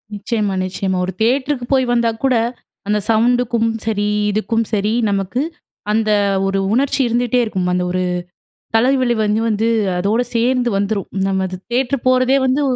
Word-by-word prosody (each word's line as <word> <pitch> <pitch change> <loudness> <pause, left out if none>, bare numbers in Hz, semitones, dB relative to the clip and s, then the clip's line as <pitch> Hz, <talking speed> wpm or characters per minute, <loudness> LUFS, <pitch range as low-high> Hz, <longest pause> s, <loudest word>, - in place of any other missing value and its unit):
நிச்சயமா, 210 -1 -2
நிச்சயமா. 185 0 -2
ஒரு 190 - -4
தியேட்டருக்கு 260 +2 +1
போய் 260 -1 +3
வந்தா 235 -1 +2
கூட, 260 -2 +3 0.5
அந்த 210 0 +1
சவுண்டுக்கும் 235 0 +2 0.2
சரி, 205 -2 0 0.2
இதுக்கும் 225 +2 0
சரி. 210 +1 +1 0.2
நமக்கு, 200 +5 -1 0.5
அந்த 215 -1 +1 0.4
ஒரு 195 0 0
உணர்ச்சி 275 +2 +1
இருந்துட்டே 245 +1 +1
இருக்கும். 185 -4 -2
அந்த 180 - 0
ஒரு 185 0 -1 0.8
தலைவலி 255 +1 +2
வந்து 210 +1 +1
வந்து, 220 +1 +1 0.3
அதோட 210 +6 +1
சேந்து 245 +1 +1
வந்துரும். 200 0 -2 0.2
நம்மது 190 -1 -1 0.2
தியேட்டர் 255 +1 0
போறதே 255 +1 +3
வந்து 265 +3 +1
225 Hz, 140 wpm, -18 LUFS, 205-250 Hz, 0.8 s, போய்